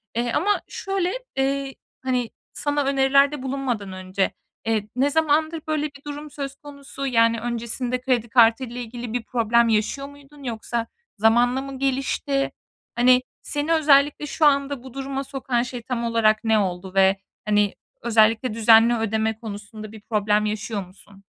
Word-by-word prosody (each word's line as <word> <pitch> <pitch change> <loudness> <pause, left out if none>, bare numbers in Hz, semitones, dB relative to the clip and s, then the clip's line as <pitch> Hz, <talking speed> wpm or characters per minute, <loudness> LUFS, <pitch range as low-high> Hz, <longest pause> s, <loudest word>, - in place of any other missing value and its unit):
Eee, 240 0 0
ama 410 +6 +1
şöyle, 390 -1 -2 0.2
eee, 275 0 -1 0.3
hani, 250 -3 0 0.2
sana 290 0 -1
önerilerde 275 +1 +3
bulunmadan 255 -7 -3
önce, 185 +1 -1 0.3
eee, 215 -2 0
ne 275 +3 +2
zamandır 315 +1 +1
böyle 305 -1 0
bir 280 -2 -8
durum 295 0 -7
söz 275 -1 -5
konusu, 280 -1 -8
yani, 230 -2 +3
öncesinde 240 +2 -3
kredi 245 -3 0
kartı 235 +1 +5
ile 245 0 -6
ilgili 240 0 -7
bir 245 -2 -2
problem 235 0 +2
yaşıyor 225 +6 0
muydun? 285 0 -16
Yoksa 230 -1 -3 0.3
zamanla 240 +4 +3
mı 270 -1 -7
gelişti? 275 +1 0 0.4
Hani 250 +1 +5 0.2
,seni 295 +3 -1
özellikle 290 -1 +4
şu 300 +2 0
anda 280 -2 +2
bu 260 -2 -11
duruma 275 0 -4
sokan 260 -3 -2
şey 245 -1 -6
tam 235 0 -3
olarak 230 -1 +2
ne 220 -1 +3
oldu 185 -1 -3
ve, 195 0 +5 0.3
hani, 210 -1 +2 0.3
özellikle 225 +1 +3
düzenli 225 +1 +6
ödeme 220 0 -1
konusunda 215 -1 -8
bir 220 -2 -12
problem 210 -1 +1
yaşıyor 210 -2 -3
musun? 195 +1 -19
245 Hz, 150 wpm, -23 LUFS, 220-275 Hz, 0.4 s, düzenli